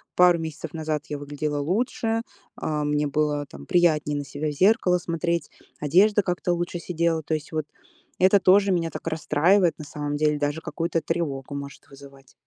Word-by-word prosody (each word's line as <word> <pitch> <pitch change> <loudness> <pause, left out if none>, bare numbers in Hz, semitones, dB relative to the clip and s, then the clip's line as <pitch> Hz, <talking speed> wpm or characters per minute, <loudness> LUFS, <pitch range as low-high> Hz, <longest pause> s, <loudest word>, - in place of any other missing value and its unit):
пару 180 -1 +5
месяцев 160 -1 -6
назад 155 -2 -3
я 145 - -3
выглядела 145 +1 -3
лучше, 225 - 0 0.3
а, 150 -1 -2
мне 150 0 +1
было 145 0 0
там - - -12
приятнее 155 -5 +2
на 145 - -4
себя 145 +3 -4
в - - -2
зеркало 185 - +3
смотреть, 170 -2 -2 0.3
одежда 200 +8 +4
как-то 180 -1 -1
лучше 175 0 -3
сидела. 170 -2 0
То 160 - -3
есть 155 0 -7
вот 155 -2 -2 0.5
это 190 +2 +5
тоже 195 +1 +5
меня 165 -2 0
так - - -8
расстраивает, 165 +3 +2
на 150 - -7
самом 145 0 -4
деле, 150 -1 +1
даже 145 +2 -1
какую-то 165 0 -2
тревогу 140 -4 -3
может 140 0 -8
вызывать. 135 -1 -15
160 Hz, 175 wpm, -25 LUFS, 145-175 Hz, 0.5 s, пару